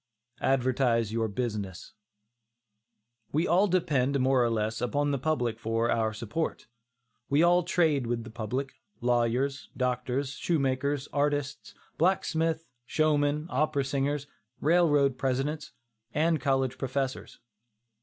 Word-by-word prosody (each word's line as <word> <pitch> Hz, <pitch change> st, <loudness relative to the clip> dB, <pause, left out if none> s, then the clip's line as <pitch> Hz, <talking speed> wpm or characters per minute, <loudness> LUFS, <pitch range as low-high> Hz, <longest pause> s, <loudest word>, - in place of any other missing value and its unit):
ADVERTISE 125 Hz, -4 st, +2 dB
YOUR 115 Hz, 0 st, 0 dB
BUSINESS. 105 Hz, -4 st, -4 dB, 1.4 s
We 155 Hz, +4 st, +1 dB
all 185 Hz, +5 st, +4 dB
depend, 140 Hz, -7 st, +1 dB
more 130 Hz, -1 st, +3 dB
or 120 Hz, -, +2 dB
less, 110 Hz, -1 st, -1 dB
upon 145 Hz, +4 st, 0 dB
the 140 Hz, -, -1 dB
public 125 Hz, -6 st, -1 dB
for 115 Hz, +1 st, 0 dB
our 110 Hz, -1 st, +1 dB
support. 115 Hz, +9 st, -3 dB, 0.6 s
We 145 Hz, +3 st, +4 dB
all 175 Hz, +1 st, +5 dB
trade 160 Hz, -7 st, +1 dB
with 120 Hz, -1 st, -1 dB
the 110 Hz, -, -10 dB
public, 125 Hz, +5 st, -3 dB, 0.3 s
lawyers, 125 Hz, +3 st, 0 dB
doctors, 125 Hz, +2 st, -1 dB
shoemakers, 140 Hz, -2 st, 0 dB
artists, 145 Hz, 0 st, -1 dB, 0.2 s
blacksmiths, 165 Hz, -2 st, +1 dB, 0.2 s
showmen, 150 Hz, -1 st, +1 dB
opera 140 Hz, +1 st, +1 dB
singers, 140 Hz, +1 st, -1 dB, 0.3 s
railroad 145 Hz, -5 st, +3 dB
presidents, 140 Hz, +3 st, -1 dB, 0.4 s
and 160 Hz, +1 st, +2 dB
college 135 Hz, -2 st, 0 dB
professors. 135 Hz, 0 st, -3 dB
135 Hz, 115 wpm, -28 LUFS, 120-150 Hz, 1.4 s, all